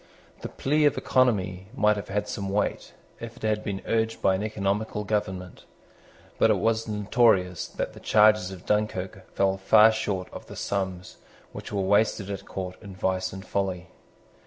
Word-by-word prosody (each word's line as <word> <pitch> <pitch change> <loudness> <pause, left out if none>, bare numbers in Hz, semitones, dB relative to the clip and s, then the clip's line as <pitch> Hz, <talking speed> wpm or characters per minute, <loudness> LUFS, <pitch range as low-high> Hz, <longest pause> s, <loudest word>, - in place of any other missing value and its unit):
The - - -5
plea 150 +2 +1
of 145 - +3
economy 95 -8 +1
might 105 -4 +3
have 100 - -6
had 105 +1 -2
some 100 -1 -4
weight, 100 +1 -2 0.3
if 115 0 -8
it - - -15
had 110 -1 0
been 100 -2 -4
urged 115 0 0
by 95 - +3
an 95 - -1
economical 105 0 -2
government. 95 -3 -3 0.7
But - - +5
it - - +4
was 115 0 0
notorious 105 -4 +2
that - - -4
the - - -12
charges 105 -3 +4
of 95 -2 -10
Dunkirk 95 -3 -2
fell 95 0 +2
far 110 +3 +6
short 100 -4 -2
of - - -9
the - - -10
sums 95 -2 -3 0.3
which - - -8
were 100 -1 -1
wasted 100 0 +2
at 100 - -6
court 95 -1 -5
in 100 -3 -10
vice 95 0 -1
and 95 0 -9
folly. 95 -3 -2
100 Hz, 175 wpm, -26 LUFS, 95-110 Hz, 0.7 s, far